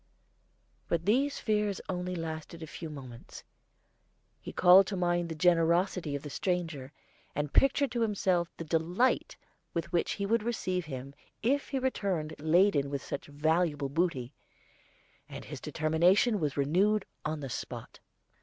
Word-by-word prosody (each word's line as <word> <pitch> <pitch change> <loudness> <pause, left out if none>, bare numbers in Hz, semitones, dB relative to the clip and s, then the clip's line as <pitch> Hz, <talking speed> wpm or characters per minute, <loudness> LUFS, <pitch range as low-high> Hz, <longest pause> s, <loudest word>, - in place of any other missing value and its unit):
But 170 0 -1
these 270 +7 +2
fears 210 -3 0
only 180 0 -3
lasted 160 0 -6
a - - -4
few 160 +1 -7
moments. 130 -5 -10 1.0
He - - -8
called 185 +2 +7
to 200 - -3
mind 175 -1 0
the 160 - -4
generosity 170 -1 +2
of 140 - -5
the 145 - -6
stranger, 165 -6 -2 0.4
and 145 0 -2
pictured 275 -1 +3
to 240 -1 -1
himself 185 -5 +1
the - - -5
delight 170 +10 +1 0.4
with 170 0 -2
which 170 - +1
he 200 - -3
would 230 +3 +2
receive 185 -6 -2
him 135 -2 -7 0.3
if 275 +5 +1
he 275 - -1
returned 195 -12 -1
laden 160 -2 +3
with 140 -1 -3
such - - -5
valuable 150 0 0
booty; 145 -5 -1 1.0
and - - -8
his - - -8
determination 180 +8 +2
was 150 -4 -2
renewed 190 +9 +2 0.2
on 155 0 -3
the 135 - -4
spot. - - -7
170 Hz, 145 wpm, -30 LUFS, 155-195 Hz, 1.0 s, called